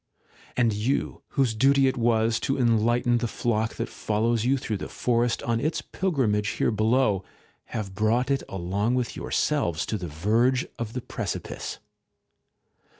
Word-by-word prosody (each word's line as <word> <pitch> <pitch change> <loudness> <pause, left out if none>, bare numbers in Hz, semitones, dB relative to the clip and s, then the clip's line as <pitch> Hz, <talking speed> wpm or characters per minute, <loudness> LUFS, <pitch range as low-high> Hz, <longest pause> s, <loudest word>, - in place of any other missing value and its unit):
And 120 -3 +3
you, 110 +7 -1 0.2
whose 130 -5 +3
duty 135 +4 +4
it 130 - +1
was 115 -2 +2
to 135 - -1
enlighten 120 0 +3
the 120 - -1
flock 110 -1 -1
that - - -3
follows 110 +1 0
you 135 +3 +3
through 110 -4 -3
the - - -6
forest 120 -1 0
on 115 -1 0
its 155 +6 -1
pilgrimage 125 - 0
here - - +2
below, 110 -2 +2 0.4
have 105 -4 -5
brought 115 +6 +1
it 135 - +1
along 95 +6 -1
with 125 -2 -1
yourselves 85 - 0
to 110 - -2
the 90 - -4
verge 115 - +2
of 115 -1 -4
the 125 - -3
precipice? - - -5
115 Hz, 150 wpm, -26 LUFS, 105-125 Hz, 0.4 s, duty